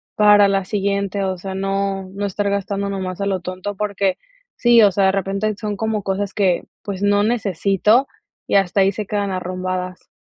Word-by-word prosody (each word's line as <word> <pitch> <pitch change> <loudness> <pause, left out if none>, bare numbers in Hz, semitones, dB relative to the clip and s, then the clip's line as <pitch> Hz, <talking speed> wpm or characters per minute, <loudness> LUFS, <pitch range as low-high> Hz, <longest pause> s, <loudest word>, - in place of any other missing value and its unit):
para 205 -1 +6
la 195 -1 0
siguiente, 200 0 -1
o 190 -1 -2
sea, 190 +2 -6
no 195 0 -2
no 200 +1 -3
estar 200 +1 -1
gastando 200 0 -2
nomás 185 -2 -4
a - - 0
lo 195 -1 0
tonto 185 +3 -5
porque 200 -2 -1 0.4
sí, 240 -1 +5
o 205 - +6
sea, 195 +1 +2
de 190 - +4
repente 195 +2 -1
son 210 -1 -3
como 220 -1 -2
cosas 195 +1 -2
que, 190 -4 +2 0.2
pues, 200 -2 -5
no 205 0 +3
necesito 210 - +2 0.4
y - - 0
hasta 195 0 +3
ahí 195 +1 +4
se 210 +2 -5
quedan 205 -1 -1
arrumbadas. 185 0 -4
200 Hz, 190 wpm, -20 LUFS, 190-205 Hz, 0.4 s, para